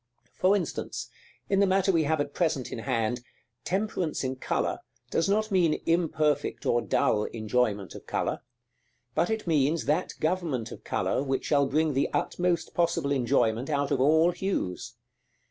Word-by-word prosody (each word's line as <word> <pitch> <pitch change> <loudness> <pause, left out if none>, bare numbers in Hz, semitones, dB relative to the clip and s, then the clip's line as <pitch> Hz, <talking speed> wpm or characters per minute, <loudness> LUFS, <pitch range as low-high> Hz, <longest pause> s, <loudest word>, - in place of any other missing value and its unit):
For 190 +2 +3
instance, 180 -7 -3 0.4
in 195 - +2
the 200 - +4
matter 190 +1 +3
we 165 -4 +2
have 155 +1 +1
at 145 0 -2
present 155 -7 0
in - - -4
hand, 115 +2 -1 0.4
temperance 190 -6 -1
in 130 0 -2
color - - -1 0.3
does 165 - +1
not 215 +2 +1
mean 175 -5 +3
imperfect 155 -4 +1
or 120 - +2
dull 105 -2 +1
enjoyment 110 -3 -1
of - - -11
color; - - -1 0.7
but 165 +6 +1
it 220 -1 -2
means 155 -3 +2
that 155 +6 0
government 155 -9 -1
of - - -10
color - - 0
which 135 -1 -1
shall 140 -2 +3
bring 155 +2 +1
the 135 +1 +1
utmost 175 -1 0
possible 170 -4 +1
enjoyment 120 -1 +1
out 140 -2 0
of 130 - +2
all 160 +5 +5
hues. 145 - -3
150 Hz, 160 wpm, -28 LUFS, 130-175 Hz, 0.7 s, all